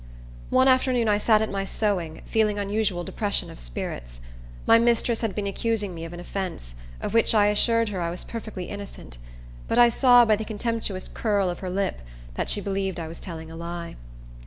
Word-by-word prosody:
One 260 +1 +4
afternoon 255 -2 +3
I 205 -1 +3
sat 215 0 +4
at 220 - -3
my 195 0 -1
sewing, 190 -6 -2
feeling 215 -2 +1
unusual 205 -3 -1
depression 205 +2 -2
of - - -11
spirits. - - -6 0.5
My 230 - +7
mistress 235 0 +2
had 225 -5 -2
been 210 - -2
accusing 205 -1 -1
me 165 -1 -6
of 165 - -8
an 175 - -7
offence, 175 - -5 0.3
of - - -4
which 230 0 +3
I 205 -1 +5
assured 230 +2 +3
her 190 -3 -3
I 170 - -1
was 175 +1 -6
perfectly 215 -5 -6
innocent; 200 - -9 0.5
but - - 0
I 240 0 +8
saw, 245 0 +6
by 220 -1 +4
the 220 - -4
contemptuous 215 -3 -3
curl 200 -5 0
of 175 - -7
her 185 - -4
lip, 190 - -1 0.3
that - - -2
she 205 - 0
believed 195 -2 -2
I 165 - -4
was 165 - -8
telling 160 -3 -7
a - - -8
lie. 170 0 -6
205 Hz, 200 wpm, -25 LUFS, 175-225 Hz, 0.5 s, I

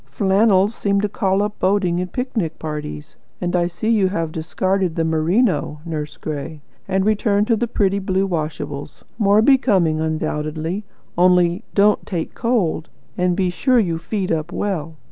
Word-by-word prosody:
"Flannels 195 +6 +3
seem 200 -2 0
to 210 - +1
call 195 0 0
up 210 0 -4
boating 185 -2 +1
and 180 0 -4
picnic 225 - -2
parties; 150 - -6 0.2
and 175 0 -1
I 175 -1 +2
see 175 +5 -5
you 205 -4 +3
have 165 -4 -2
discarded 185 +2 -1
the 165 - 0
merino, 160 +1 +1
Nurse 150 -3 -5
Gray, 150 0 -5 0.3
and 190 0 +1
returned 210 -1 +2
to 230 - +5
the 235 +2 -1
pretty 200 -3 +1
blue 190 0 0
washables. 155 -4 -4 0.2
More 205 0 +4
becoming, 195 - +3
undoubtedly; 160 +4 -2 0.3
only, 180 +2 +4
don't 205 +1 +4
take 170 -5 -3
cold; 210 -10 0 0.3
and 180 0 +1
be 185 -1 +1
sure 255 +7 +2
you 170 -8 +1
feed 195 +1 -3
up 160 0 -1
well. 165 -6 -3
185 Hz, 160 wpm, -20 LUFS, 160-205 Hz, 0.3 s, to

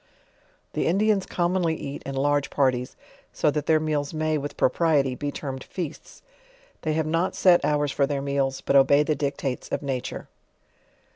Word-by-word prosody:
The - - 0
Indians 200 +2 +2
commonly 175 -2 0
eat 140 -2 -6
in 135 - -4
large 145 +1 +1
parties, 130 -3 0 0.4
so 150 - +1
that 150 -1 -3
their 160 -1 +4
meals 155 -1 -2
may, 155 0 0
with 145 -1 -4
propriety, 145 -3 +2
be 145 +3 -4
termed 135 -2 -6
feasts; 170 -5 -7 0.6
they 155 - -1
have 160 0 0
not 165 +4 0
set 180 -2 +5
hours 145 -1 +1
for 140 0 +1
their 140 -1 -1
meals, 140 -1 -1
but - - 0
obey 140 +2 +6
the 155 - +1
dictates 140 -2 -3
of - - -3
na 135 -2 -1
ture. - - -7
145 Hz, 170 wpm, -25 LUFS, 140-160 Hz, 0.6 s, obey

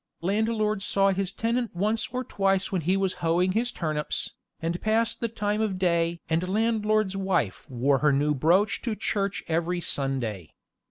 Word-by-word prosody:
Landlord 215 +2 +1
he - - -3
saw 195 0 +3
his 195 0 -1
tenant 230 +1 -1
once 215 +5 0
or 255 0 -2
twice 195 -4 0
when 185 -3 0
he 185 +5 +1
was 195 -1 0
hoeing 175 +3 +2
his 235 +5 0
turnips, 155 -3 -2 0.3
and 170 +2 -2
passed 225 +1 +1
the 230 - 0
time 210 -1 -1
of 205 -4 -1
day 170 -2 +1
and 165 +3 0
landlord's 215 -1 +1
wife 190 - -1
wore 135 +2 +2
her 150 +1 +4
new 145 +2 +2
brooch 175 +9 +2
to 230 -4 -2
church 200 -2 -1
every 170 +2 0
Sunday. 130 - -2
190 Hz, 170 wpm, -26 LUFS, 165-215 Hz, 0.3 s, her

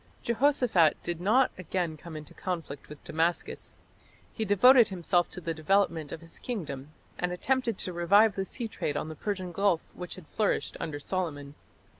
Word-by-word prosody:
Jehoshaphat 235 - +3
did 170 -1 -3
not 240 +8 +4
again 175 -2 -2
come 160 +1 -9
into 150 -2 -10
conflict 165 -7 -5
with 150 -1 -11
Damascus. 165 +1 -2 0.6
He 220 - -2
devoted 235 +4 +7
himself 175 -3 +1
to - - -6
the 165 -2 -3
development 165 -1 +1
of 165 - -6
his 165 0 -12
kingdom, 155 - -5 0.3
and 180 0 0
attempted 240 +3 0
to 185 - -3
revive 200 +5 +5
the 195 - -1
sea 235 +4 -4
trade 145 -8 -3
on 155 - -3
the 160 - -7
Persian 185 +1 -3
gulf 195 -2 +2
which 180 -1 -6
had 185 -4 -12
flourished 215 -2 0
under 145 -2 -4
Solomon. 145 -4 -3
180 Hz, 170 wpm, -29 LUFS, 160-205 Hz, 0.6 s, devoted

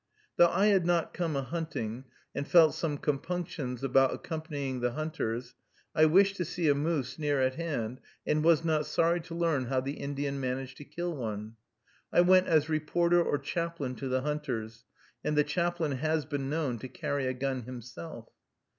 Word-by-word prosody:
Though 175 - +7
I 195 +4 +2
had 200 -4 +4
not 170 -1 +1
come 165 -4 -1
a 135 - 0
hunting, 130 -7 -4 0.3
and 140 +1 -3
felt 165 -3 +6
some 150 -3 -2
compunctions 145 -4 -3
about 135 0 +4
accompanying 145 -5 -4
the 120 0 0
hunters, 125 -6 -3 0.4
I 155 - +5
wished 195 +5 +5
to 180 - 0
see 170 0 -1
a - - +6
moose 145 -2 -1
near 145 -2 +1
at 130 0 +2
hand, 130 -7 -3 0.3
and 150 0 +1
was 165 0 +4
not 155 -2 +1
sorry 170 +3 +2
to 165 +1 -8
learn 165 -6 +1
how 130 +1 +1
the 135 +3 -4
Indian 140 0 -3
managed 130 0 -3
to 145 - -10
kill 175 +1 -4
one. 110 -3 -5 0.6
I - - +6
went 185 +1 +5
as 155 -2 +3
reporter 170 +3 +2
or 145 - +1
chaplain 160 -2 -3
to 135 - -4
the 130 0 +1
hunters, 125 -6 -3 0.4
and 150 - 0
the 150 - +6
chaplain 170 +1 0
has 155 +3 0
been 140 -2 -3
known 145 -6 -1
to 130 - -6
carry 140 -1 -2
a 130 - 0
gun 130 -2 -2
himself. 120 -9 -8
150 Hz, 180 wpm, -30 LUFS, 130-165 Hz, 0.6 s, Though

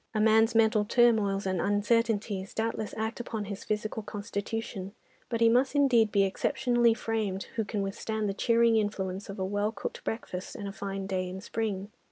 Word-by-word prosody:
A - - +2
man's 220 +1 +4
mental 220 -1 +4
turmoils 210 -4 +3
and 185 -2 0
uncertainties 205 -1 0
doubtless 220 -1 -2
act 220 +2 -2
upon 220 -3 -4
his 200 0 -6
physical 215 +1 -2
constitution, 205 -1 -5 0.3
but 230 -1 -2
he 230 - +7
must 250 +5 +3
indeed 245 -7 +4
be 200 -1 +4
exceptionally 235 +4 +2
framed 215 -4 -2
who 225 - +1
can 205 -1 -2
withstand 215 +2 -2
the 195 - -1
cheering 230 +1 +3
influence 200 -2 -2
of 200 - -6
a 190 - -1
well 205 +2 0
cooked - - -6
breakfast 185 -5 -5
and 200 - -5
a - - -4
fine 195 -1 -4
day 185 -1 -2
in 185 +1 -6
spring. 205 -1 -3
215 Hz, 180 wpm, -29 LUFS, 195-225 Hz, 0.3 s, he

